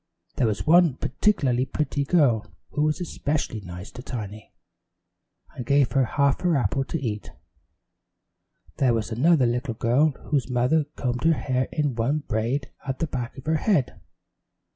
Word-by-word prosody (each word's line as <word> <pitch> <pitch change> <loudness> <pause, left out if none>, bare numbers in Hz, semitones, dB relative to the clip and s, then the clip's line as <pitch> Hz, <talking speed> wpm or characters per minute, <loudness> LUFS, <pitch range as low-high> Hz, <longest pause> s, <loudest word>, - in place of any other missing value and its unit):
There 120 - +3
was 105 -2 -2
one 165 -3 +5
particularly 130 - +1
pretty 145 +1 -1
girl 125 -10 +2 0.2
who 150 - -1
was 150 +2 +1
especially 150 -9 -2
nice 90 +1 -9
to 125 - -9
Tiny, 110 -5 -7 1.0
and 125 - -6
gave 140 0 +3
her 135 -1 +3
half 140 +3 +1
her 175 -3 +2
apple 135 +1 0
to 165 - -3
eat. 110 -6 -4 1.5
There 125 -4 +3
was 115 +1 -3
another 140 +4 +4
little 120 0 -1
girl 125 +8 +3 0.2
whose 135 -5 +1
mother 125 +5 +2
combed 125 -1 -2
her 165 - +6
hair 130 -4 -1
in 150 -3 0
one 135 +6 0
braid 120 +5 -1
at 135 -2 -3
the - - -1
back 130 -4 -5
of 130 - -10
her 160 +1 +2
head. 150 - 0
130 Hz, 160 wpm, -25 LUFS, 120-150 Hz, 1.5 s, her